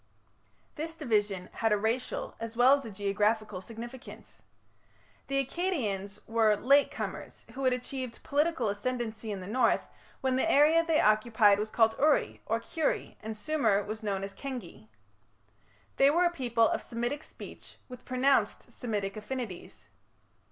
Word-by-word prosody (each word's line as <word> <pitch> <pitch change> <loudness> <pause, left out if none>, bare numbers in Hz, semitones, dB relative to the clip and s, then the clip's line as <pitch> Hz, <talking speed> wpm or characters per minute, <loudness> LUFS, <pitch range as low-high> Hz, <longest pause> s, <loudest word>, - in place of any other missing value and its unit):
This 325 +2 -5
division 210 - 0
had 225 -1 0
a 210 - +4
racial 225 +5 -2
as 230 0 -6
well 250 +3 +7
as 280 -2 +1
a - - -6
geographical 205 0 0
significance. 235 +5 -10 0.9
The 275 0 +1
Akkadians 215 - -2
were 225 -2 +3
"late 275 +6 +4
comers" - - -6
who 270 +1 -3
had 255 - +4
achieved 250 -1 -5
political 295 -4 +1
ascendency 220 0 -3
in 195 -2 -4
the - - -7
north 230 +4 +2 0.4
when 260 -1 +1
the 330 +5 +2
area 310 +4 +5
they 325 -2 +2
occupied 215 -1 +4
was 215 +1 -2
called 225 0 +3
Uri, 300 +1 +2
or 225 +1 +1
Kiuri, 310 +6 -2
and 220 0 -6
Sumer 220 -7 +1
was 215 +2 -6
known 200 -3 -2
as 195 0 -6
Kengi. 245 - -7 1.1
They 275 - +6
were 345 +5 +3
a 345 - +3
people 240 -7 +2
of - - -1
Semitic 240 +5 -3
speech - - -12
with 250 -1 -11
pronounced 260 +2 +1
Semitic 205 -5 -3
affinities. 215 -4 -6
230 Hz, 150 wpm, -30 LUFS, 210-270 Hz, 1.1 s, well